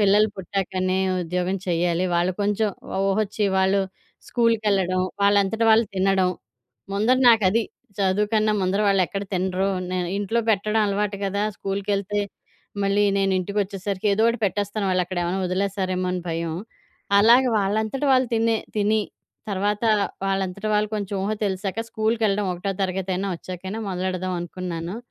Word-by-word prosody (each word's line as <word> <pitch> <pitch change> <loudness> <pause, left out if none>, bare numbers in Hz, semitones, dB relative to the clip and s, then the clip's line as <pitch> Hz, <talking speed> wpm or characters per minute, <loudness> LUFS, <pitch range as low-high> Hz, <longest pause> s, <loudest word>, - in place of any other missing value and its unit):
పిల్లలు 210 +1 +5
పుట్టాకనే 185 0 -1 0.2
ఉద్యోగం 180 +2 -1
చెయ్యాలి, 175 +1 +1
వాళ్ళు 175 +2 +2
కొంచెం 210 +1 +1 0.3
ఒ - - 0
ఊహొచ్చి, 210 +1 0
వాళ్ళు 190 +1 +3 0.5
స్కూలుకెళ్ళడం, 210 -6 +2 0.2
వాళ్ళంతట 200 +2 +3
వాళ్ళు 220 +1 +5
తినడం. 190 -1 +2 0.6
ముందర 220 +6 +3
నాకది. 225 -1 +4 0.4
చదువు 200 +1 +1
కన్నా 215 -1 +3
ముందర 190 +2 +1
వాళ్ళెక్కడ 195 0 +1
తినరో! 185 +1 0 0.2
నేను 180 -1 -1
ఇంట్లో 205 +3 0
పెట్టడం 215 +1 +1
అలవాటు 205 0 -1
గదా! 200 +1 -1
స్కూల్‌కెళ్తే 200 +1 -2 0.6
మళ్ళీ 200 +1 +2
నేనింటికొచ్చేసరికి 195 +1 -1
ఏదోటి 225 +3 +3
పెట్టేస్తాను, 205 +1 -1
వాళ్ళక్కడేవన్నా 180 0 -1
ఒదిలేస్తారేమో 185 0 -1
అని 180 - -2
భయం. 165 0 -2 0.7
అలాగే, 240 +5 +6
వాళ్ళంతట 215 +6 -1
వాళ్ళు 255 0 +4
తినే 225 0 +2 0.2
తిని 215 +1 +2 0.5
తర్వాతా, 205 +3 +1 0.4
వాళ్ళంతట 195 +1 -2
వాళ్ళు 210 0 +1
కొంచుం 205 -1 -3
ఊహ 210 - 0
తెలిశాక 195 +2 -2
స్కూల్‌కెళ్ళడం 220 -2 +1
ఒకటో 195 +3 -3
తరగతయినా 190 +1 -1
ఒచ్చాకైనా 185 +5 -6
మొదలెడదావనుకున్నాను. 180 -1 -3
195 Hz, 120 wpm, -23 LUFS, 185-210 Hz, 0.7 s, అలాగే